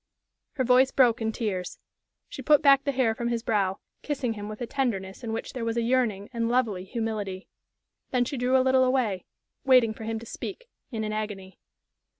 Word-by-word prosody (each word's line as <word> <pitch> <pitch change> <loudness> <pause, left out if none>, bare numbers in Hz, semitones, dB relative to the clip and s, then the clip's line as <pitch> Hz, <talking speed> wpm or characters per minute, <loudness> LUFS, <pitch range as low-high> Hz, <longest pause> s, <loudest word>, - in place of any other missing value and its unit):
Her 265 - 0
voice 255 +1 +5
broke 245 -4 +3
in 220 0 0
tears. 195 -6 -3 0.5
She - - -8
put 300 -1 +4
back 275 -1 +6
the 280 - +1
hair 255 -4 +2
from 235 +1 -3
his 235 -1 -1
brow, 195 -4 +1 0.2
kissing 265 -6 -2
him 205 -1 -7
with 215 - -7
a 240 - -3
tenderness 230 -6 -2
in 230 - -3
which 225 - -4
there 250 - -4
was 230 0 -1
a 235 - +1
yearning 230 -5 +1
and 230 -1 -1
lovely 225 -7 0
humility. 205 -3 -4 0.6
Then 250 -1 +1
she 280 - -4
drew 250 +1 +2
a 260 - +3
little 260 0 +4
away, 250 -8 0 0.4
waiting 250 -4 +5
for 220 0 -9
him 225 0 -2
to 225 - -8
speak, 400 - -7 0.2
in 225 -4 -3
an 215 0 -3
agony. 205 -3 -5
230 Hz, 200 wpm, -27 LUFS, 215-255 Hz, 0.6 s, back